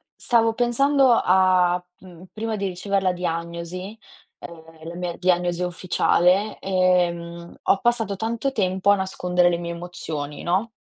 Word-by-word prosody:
stavo 230 -2 +2
pensando 260 +3 +3
a, 185 -3 +3 0.2
mhmm, 180 -1 -14
prima 220 0 -4
di 200 -1 -2
ricever 195 +2 -2
la 185 -1 +2
diagnosi, 170 +3 -5 0.4
ehm, 160 -1 -12
la 170 - -7
mia 175 -1 -4
diagnosi 175 -1 0
ufficiale, 180 +3 +1
ehm, 175 -2 0
ho 195 - +3
passato 235 -4 0
tanto 230 +6 -2
tempo 190 -2 +1
a - - +5
nascondere 180 -2 +1
le 170 - 0
mie 170 0 -5
emozioni, 160 -4 -6
no? 190 +6 0
180 Hz, 140 wpm, -23 LUFS, 175-200 Hz, 0.4 s, a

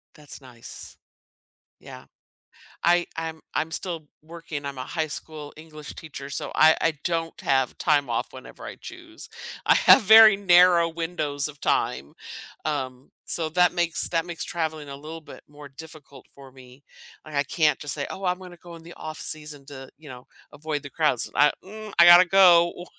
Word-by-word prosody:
That's 150 -2 -12
nice, 125 -3 -12 0.8
yeah. - - -13 0.8
I 175 0 +3
I'm 160 -1 -5
I'm 160 +1 -2
still 165 -3 -5
working, 160 -2 -8
I'm 140 -1 -6
a 130 - -5
high 160 +4 -3
school 150 0 -9
English 155 -1 -11
teacher, 140 -3 -9
so, - - -5
I 160 0 +6
I 165 - +1
don't 165 -1 -3
have 135 -2 0
time 145 -3 +1
off 115 - -2
whenever - - -12
I - - -8
choose. 345 -3 -12 0.4
I - - +5
have - - +6
very 220 0 +8
narrow 175 -3 +5
windows 160 -4 -3
of 145 -2 -13
time. 70 - -1 0.5
Um, 130 -4 -5 0.2
so, 160 -2 -2
that 180 +2 +2
makes, 175 -2 -1
that 165 -1 -1
makes 170 -1 -6
traveling 160 -3 -4
a 140 - -7
little 155 +3 -10
bit 155 - -13
more 145 0 -13
difficult 145 -2 -14
for 135 -1 -14
me. 130 +1 -17 0.4
Like, 155 - -12
I 140 - +2
can't 150 +1 0
just 145 -1 -5
say, 145 - -4
"Oh, 195 - -7
I'm 180 0 0
gonna 180 -1 -12
go 170 0 -13
in 165 - -14
the 170 +1 -12
off-season 155 -2 -6
to, 135 -2 -11
you 150 0 -15
know, 125 -1 -12 0.3
avoid 150 -1 -5
the 140 - -9
crowds." 150 -7 0
I, 145 +2 +4
mm, 215 +2 -10
I 170 - +9
gotta 175 +1 +9
go 175 -2 +4
155 Hz, 180 wpm, -24 LUFS, 145-170 Hz, 0.8 s, I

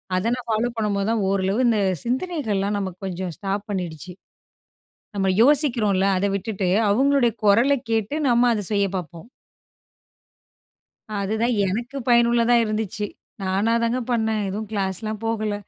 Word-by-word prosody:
அத 185 +3 -1
நான் 250 -1 -9
ஃபாலோ 225 +2 +1
பண்ணும்போது 205 -2 0
தான் 225 -3 0
ஓரளவு 195 +2 0
இந்த 225 -3 +2 0.2
சிந்தனைகள்லாம் 235 - -1
நமக்கு 185 -2 -5
கொஞ்சம் 185 -1 -4
ஸ்டாப் 200 +1 -3
பண்ணிடுச்சு. 180 -2 -5 1.0
நம்ம 195 -1 0
யோசிக்றோன்ல, 235 -8 +3
அத 200 - 0
விட்டுட்டு, 200 -2 -2 0.2
அவங்களுடைய 265 +1 +3
குரலக் 235 +5 +3
கேட்டு 220 +4 0
நம்ம 240 0 +4
அத 210 -2 -2
செய்யப் 200 -1 0
பாப்போம். 175 +2 -8 1.9
அதுதான் 220 +5 0
எனக்கு 240 +8 -3
பயனுள்ளதா 235 0 +4
இருந்துச்சு. 215 0 -3 0.4
நானாதாங்க 230 +6 +1
பண்ணேன். 220 -2 0
எதுவும் 210 +2 -5
கிளாஸ்லாம் 205 +1 -3
போகல. 215 -2 -1
215 Hz, 120 wpm, -23 LUFS, 195-235 Hz, 1.9 s, நம்ம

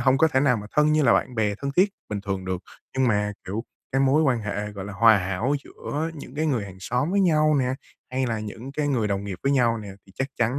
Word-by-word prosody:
hông 130 +1 +3
có 160 - +5
thể 130 -3 +2
nào 130 -4 +3
mà 105 - -6
thân 150 0 +3
như 155 -1 +3
là 125 - +5
bạn 125 - +1
bè 105 -2 +1
thân 140 +5 -4
thiết 190 +3 +5 0.2
bình 105 -1 -3
thường 95 -2 -3
được. 95 0 -3 0.4
Nhưng 130 -2 +4
mà, 105 -1 +1
kiểu, 105 +6 -4 0.3
cái 135 - +2
mối 135 +3 +4
quan 125 -6 +2
hệ, 105 0 -3
gọi 100 -2 -6
là, 105 - -7
hòa 110 +1 +6
hảo 95 +9 -1
giữa 160 +3 -4
những 140 -3 -10
cái 155 +2 0
người 125 -8 0
hàng 95 -2 -10
xóm 125 - -1
với 200 +1 +2
nhau 155 -4 +4
nè, 130 0 +1 0.4
hay 130 0 0
là 115 -2 -1
những 110 +5 -7
cái 145 0 -1
người 115 -6 +1
đồng 100 0 -1
nghiệp 95 -3 -5
với 140 +1 +2
nhau 120 -4 +3
nè 105 -2 -8 0.2
thì 95 - -18
chắc 135 +1 -2
chắn 120 +4 +1
125 Hz, 270 wpm, -25 LUFS, 105-140 Hz, 0.4 s, hòa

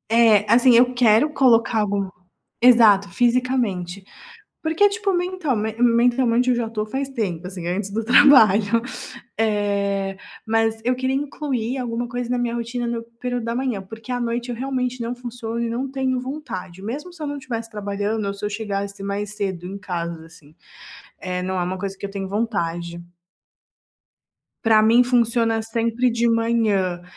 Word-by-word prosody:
é 220 -3 +5
assim, 245 +1 +6
eu 250 +1 +5
quero 245 +3 +4
colocar 235 -5 +3
algo 200 -2 -1 0.5
exato, 225 -5 +6
fisicamente, 235 -7 0 0.6
porque 325 +5 +3
tipo 400 -1 -1
mentalme 305 - -1
mentalmente 245 +1 +3
eu 245 - +2
já 235 - -1
estou 215 -1 -3
faz 265 +5 -3
tempo 190 -9 -3
assim, 180 -2 -7
antes 195 +2 -2
do 220 +2 -2
trabalho, 230 -5 +6 0.6
eh, 200 -2 0 0.3
mas 225 0 +1
eu 250 +1 +1
queria 260 +1 -1
incluir 270 -3 -3
alguma 240 -1 -3
coisa 245 0 -4
na 250 - 0
minha 240 -1 -1
rotina 235 +1 -3
no 235 -1 -3 0.2
período 245 -1 -3
da 230 0 -2
manhã, 250 -5 -2
porque 225 +5 -11
à 250 - -1
noite 240 +1 -2
eu 240 - -4
realmente 255 -1 -2
não 235 +1 -3
funciono 240 -2 -6
e 235 -1 -1
não 255 +4 -3
tenho 265 -1 -1
vontade, 220 - -7
mesmo 290 - -6
se 335 - -11
eu 300 - -2
não 285 0 -4
tivesse 230 -4 -5
trabalhando 205 +1 -3
ou 200 - -2
se 200 - -8
eu 210 - -1
chegasse 200 -2 -4
mais 205 +1 -3
cedo 190 -4 -3
em 195 +2 -6
casa 170 -4 -5
assim, 160 -1 -19 0.6
eh, 180 -1 -3
não 185 +1 -2
é - - 0
uma 185 +1 -3
coisa 195 0 -5
que - - -6
eu 200 - -6
tenho 195 -1 -4
vontade. 170 -5 -3 1.6
Para 220 -1 +5
mim 225 +3 +5
funciona 230 -2 +2
sempre 230 +2 0
de 235 0 +1
manhã, 220 -6 +1
230 Hz, 170 wpm, -22 LUFS, 200-250 Hz, 1.6 s, assim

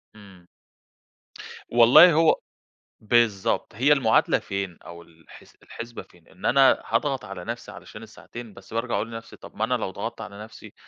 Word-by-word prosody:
إمم. 95 -4 -17 1.2
والله 120 +9 +7
هو 160 +1 +3 0.6
بالضبط، 110 -3 0
هي 135 +7 +4
المعادلة 120 -6 +2
فين 100 -3 -5
أو 85 0 -11
الحس 80 -1 -18
الحِسْبة 115 0 -9
فين؟ 85 -2 -24
إن - - -12
أنا 135 +1 +4
هاضغط 140 -3 -1
على 95 -3 -9
نَفْسي - - -6
علشان - - -12
الساعتين، 120 -3 -11
بس - - -15
بارجع 115 +1 -2
أقول 110 - -2
لنَفْسي، 115 0 -9
طَب - - -14
ما 110 - -2
أنا 125 - -2
لو 110 -6 -2
ضغطت 115 +3 -6
على 105 -1 -9
نَفْسي 110 - -13
115 Hz, 160 wpm, -24 LUFS, 100-120 Hz, 1.2 s, والله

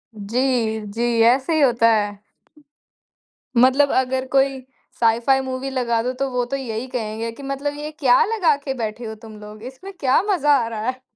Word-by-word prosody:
जी, 225 +1 -1
जी। 230 +3 -3 0.3
ऐसे 265 +6 +1
ही 310 - +2
होता 235 -4 +4
है। 205 -1 -1 1.4
मतलब 265 +3 +5
अगर 260 0 -1
कोई 270 0 +2 0.4
साइ 230 0 +3
फाइ 265 +2 +2
मूवी 260 +1 -4
लगा 235 -3 0
दो, 255 +1 -2
तो 270 +1 -2
वो 250 -1 0
तो 275 +3 -4
यही 240 -1 -5
कहेंगे 225 -2 -4
कि 275 +5 -12
मतलब 275 +1 -3
ये 300 +1 -6
क्या 250 -4 +5
लगा 380 -9 +2
के 280 -2 -4
बैठे 230 -1 -5
हो 220 0 -6
तुम 220 -2 -11
लोग? 210 0 -11
इसमें 270 +11 -9
क्या 265 +2 +3
मज़ा 295 -5 +3
आ - - -3
रहा 225 0 -5
है। 255 0 -5
255 Hz, 190 wpm, -21 LUFS, 230-275 Hz, 1.4 s, मतलब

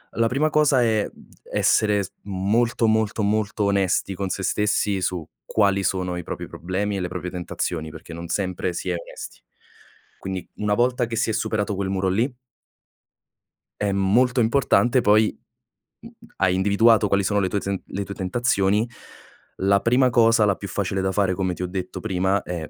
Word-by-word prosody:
La 115 0 +2
prima 140 +6 +1
cosa 145 -5 +4
è, 110 -2 +1
mhmm, - - -19 0.2
essere 105 -2 +2
s 90 - -9
molto, 110 +5 0
molto, 110 0 +1
molto 105 0 0
onesti 100 -1 +1
con 95 0 -3
se 95 +1 -3
stessi 105 -1 0
su 90 -3 -2 0.2
quali 100 -2 +2
sono 90 -1 -1
i 90 - -5
propri - - -6
problemi 100 +3 -3
e - - -2
le 90 - -2
proprie 90 0 -5
tentazioni, 85 -2 -4
perché 80 +2 -11
non 85 +1 -7
sempre 95 -1 -2
si 90 - -4
è 90 - 0
onesti. 85 - -9 0.8
Quindi, 95 -1 -5
una 105 0 0
volta 125 +1 +1
che 115 - -4
si 115 0 0
è - - -2
superato 105 -1 -1
quel 95 0 -2
muro 95 -1 0
lì 120 +8 0 1.5
è 100 -1 +1
molto 120 +7 +2
importante 120 +1 +3
poi, 105 0 +3 0.7
mhmm, - - -12 0.3
hai 95 -1 +2
individuato 105 +3 +4
quali 100 0 +2
sono 105 +2 +1
le 95 -2 0
tue 100 - -1
zen 100 -1 -3
le 100 - -4
tue 100 - -6
tentazioni, 105 +1 +1 0.7
la 100 +1 +2
prima 125 +2 +3
cosa 115 -2 +4
la 100 -2 +2
più 100 - -7
facile 95 0 -2
da 95 0 0
fare, 95 -2 +1
come 95 0 -1
ti 90 - -5
ho 90 - -1
detto 90 0 -5
prima, 95 -1 0
è 85 -3 -5
100 Hz, 180 wpm, -23 LUFS, 95-110 Hz, 1.5 s, cosa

